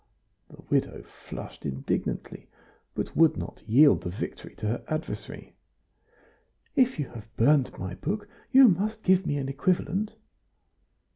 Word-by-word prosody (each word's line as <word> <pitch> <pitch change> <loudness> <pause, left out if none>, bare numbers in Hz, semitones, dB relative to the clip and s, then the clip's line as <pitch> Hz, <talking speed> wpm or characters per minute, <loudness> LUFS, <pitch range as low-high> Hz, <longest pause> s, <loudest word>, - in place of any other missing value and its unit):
The - - -15
widow - - 0
flushed - - -10
indignantly, 70 -1 -3 0.5
but - - -4
would 165 -1 +5
not - - -6
yield 140 +6 +6
the 90 - -4
victory 90 - -6
to 110 - -6
her 110 +3 -1
adversary. 155 0 -5 1.2
"If 255 -5 +3
you 145 -4 -3
have 115 -2 -10
burned 135 +3 +3
my 95 -1 -5
book 205 - -3 0.2
you 265 -1 +9
must 215 +3 0
give 190 0 +3
me 145 - 0
an 135 -1 -2
equivalent." 185 +8 0
155 Hz, 135 wpm, -27 LUFS, -, 1.2 s, you